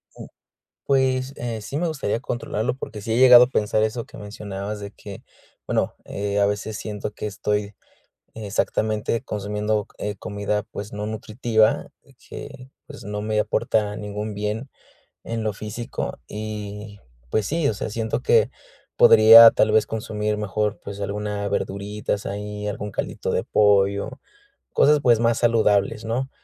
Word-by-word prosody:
U - - -10 0.6
Pues, 130 -1 +1
eh, 115 -3 -4
sí 135 - -5
me 170 +2 0
gustaría 135 -8 -2
controlarlo 120 0 -3
porque 105 -5 -7
sí 110 +2 -2
he 115 - +1
llegado 125 -1 +9
a 125 - -11
pensar 110 -2 +1
eso 110 +2 -2
que - - -13
mencionabas 105 0 -6
de 100 0 -7
que, 100 -2 -11 0.4
bueno, - - 0
eh, 100 0 -2
a 100 - +4
veces 105 +1 -2
siento 105 0 -5
que 105 - -7
estoy 105 0 -2 0.6
exactamente 110 +1 -1
consumiendo 105 -2 -2
c 105 - -3
eh, - - -8
comida, 100 0 -2
pues, 105 +1 -8
no 105 0 -4
nutritiva 110 +1 +1 0.4
que, 135 -2 -9 0.2
pues, - - -11
no 105 +1 -4
me 110 0 0
aporta 105 -1 0
ningún 105 0 -5
bien 105 +5 -3 0.5
en 115 -1 -4
lo 105 -2 -1
físico 110 +3 -5
y, 105 -1 -7 0.3
pues 110 +6 0
sí, 160 -1 0
o - - +1
sea, 105 - -4
siento 110 +2 -2
que 115 -1 +3 0.5
podría, 115 +1 +9
tal 110 - +2
vez, 110 -1 +4
consumir 105 -1 -2
mejor, 105 0 -2
pues, 100 0 -7
alguna 100 0 -3
verduritas 100 +1 -3
ahí, 105 +1 -5
algún 105 0 -4
caldito - - -3
de - - 0
pollo, 100 +5 +2 0.5
cosas, 150 0 +5
pues, 120 -4 +4
más 115 0 +2
saludables, 110 -2 +2
¿no? 125 +4 -2
105 Hz, 155 wpm, -23 LUFS, 105-115 Hz, 0.6 s, llegado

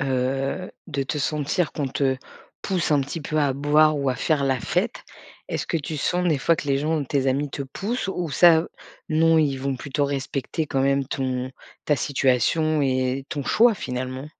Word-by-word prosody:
heu, 135 +6 -1 0.2
de 140 -6 -2
te 135 +3 -3
sentir 150 +3 0
qu'on 145 - -2
te 135 0 0 0.5
pousse 185 -5 -1
un 145 -2 +4
petit 145 +5 -5
peu 155 +1 -4
à 145 -3 +2
boire 150 +2 +3
ou 140 -1 0
à 130 - +1
faire 145 +1 +1
la 135 -1 +1
fête? - - -2 0.4
Est-ce - - -3
que - - 0
tu 155 0 -4
sens, 180 +5 0
des 155 -5 +2
fois, 165 +4 +2
que - - -6
les 135 -1 +2
gens 155 +3 0
ou 150 - -1
tes 135 0 0
amis 140 +2 0
te 140 - -6
poussent, 200 - -4
ou 180 -4 -3
ça, 165 +2 +5 0.4
non, 165 +1 +4
ils 145 -4 +2
vont 135 0 -2
plutôt 140 +2 -1
respecter 140 +2 -3
quand 135 -2 -1
même 140 0 +2
ton 130 -2 -2 0.3
ta 150 - +3
situation 145 +3 +1
et 130 0 0
ton 145 -2 -4
choix, 230 - +4
finalement? 130 -1 -5
140 Hz, 195 wpm, -24 LUFS, 135-155 Hz, 0.5 s, ça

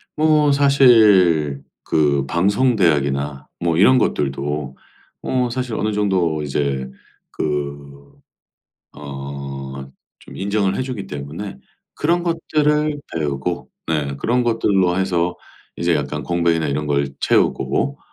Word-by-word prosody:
뭐 150 -1 +3
사실 105 - +5 0.2
그 70 -3 +1
방송대학이나 75 - +1
뭐 85 -1 0
이런 130 +8 +6
것들도 70 - -1 0.5
어 125 -1 0
사실 125 -2 -3
어느 110 0 -1
정도 95 -7 0
이제 70 -2 -2 0.4
그 70 -1 -5 0.8
어 70 -1 -7 0.5
좀 - - -13
인정을 100 -1 0
해주기 125 -6 -4
때문에 75 +2 -7 0.3
그런 170 +3 0
것들을 150 -3 0
배우고 75 +2 -3 0.2
네 75 -4 -1
그런 125 - +1
것들로 95 -6 +1
해서 90 -2 0 0.4
이제 85 0 +1
약간 75 -2 -3
공백이나 85 -2 +1
이런 75 +1 -2
걸 70 -1 0
채우고 135 - +1
85 Hz, 220 characters per minute, -20 LUFS, 70-115 Hz, 0.8 s, 이런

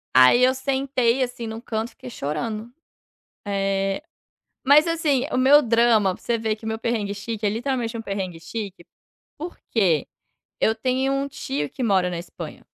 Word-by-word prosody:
Aí 130 - +7
eu 255 +1 +5
sentei, 265 -2 +1
assim, 240 -2 -5
num 220 0 -5
canto 225 -1 -3
e - - -20
fiquei 255 +1 -11
chorando. 215 +7 -4 0.7
Eh, 195 +2 0 0.6
mas, 290 +3 +7
assim, 310 -6 +1
o - - 0
meu 275 +3 +7
drama 230 -5 +3
você 235 -1 -1
vê 220 -1 -1
que 220 +1 -10
meu 220 0 -2
perrengue 220 -3 -1
chique 215 +1 -4
é - - +3
literalmente 235 +1 -2
um 225 - -4
perrengue 190 -5 -4
chique, 195 0 -6 0.5
porque 215 - 0 0.5
eu 220 - +3
tenho 260 +3 0
um 275 0 0
tio 145 - -3
que - - -7
mora 195 -6 +3
na 175 - -4
Espanha. 175 - -9
225 Hz, 165 wpm, -23 LUFS, 200-255 Hz, 0.7 s, Aí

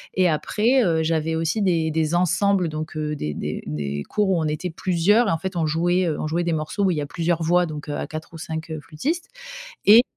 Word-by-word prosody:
et 185 -1 +4
après, 225 - +2
heu, 160 -4 +2
j'avais 160 0 0
aussi 165 +6 0
des 165 -5 +2
des 160 +1 0
ensembles 185 +1 +2
donc 155 +1 -5
des 150 - -3
des - - -4
des 70 -1 -3
cours 210 -2 +1
où 175 - +2
on 155 - 0
était 155 +3 -3
plusieurs, 190 +7 +2
et - - +2
en 165 - +1
fait 190 +2 -5
on 165 -2 +1
jouait, 175 +3 +1
heu 155 - -1
on - - -2
jouait 170 +3 0
des 170 - 0
morceaux 155 +6 -1
où - - +3
il 165 - -1
y - - 0
a - - -2
plusieurs 165 +2 -1
voix 175 +2 +3
donc, 150 -1 -7
heu, 145 - -2
à - - -3
4 155 +1 -8
ou 165 - -9
5 160 0 -5
flûtistes 270 - -3 0.6
et 225 +4 +9
165 Hz, 240 wpm, -23 LUFS, 155-185 Hz, 0.6 s, et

